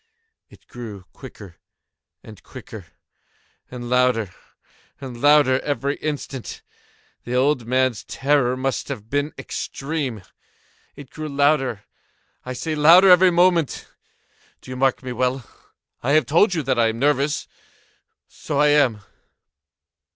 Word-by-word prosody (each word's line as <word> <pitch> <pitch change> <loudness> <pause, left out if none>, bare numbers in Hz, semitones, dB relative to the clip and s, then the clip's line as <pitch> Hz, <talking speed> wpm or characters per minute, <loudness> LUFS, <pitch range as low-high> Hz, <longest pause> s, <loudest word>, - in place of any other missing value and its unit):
It - - -20
grew 110 -6 -10
quicker 105 -9 -13 0.7
and 110 -2 -13
quicker, 110 -7 -11 0.8
and 120 -1 -8
louder 125 -5 +1 0.7
and 125 -3 -9
louder 145 -3 +4
every 140 0 -2
instant. 140 -4 -6 0.6
The 120 - -4
old 130 -2 +1
man's 130 -2 0
terror 135 -3 0
must 135 0 -3
have 115 -6 -8
been 145 +2 -1
extreme! 135 - -5 0.7
It 140 -3 -13
grew 155 -1 -6
louder, 140 -6 +1 0.6
I 130 - -6
say, 155 +6 -4
louder 170 +5 +6
every 180 +1 +7
moment!—do 170 -6 -3
you - - -5
mark 130 0 0
me 130 - -5
well? 125 0 -2 0.5
I 135 +4 0
have 155 -3 +4
told 175 - +3
you 160 - -2
that 130 -2 0
I 115 - +4
am 110 0 -3
nervous: 145 +2 0 0.8
so 145 -2 -5
I 150 0 +4
am. 135 -8 +2
135 Hz, 125 wpm, -21 LUFS, 120-150 Hz, 0.8 s, every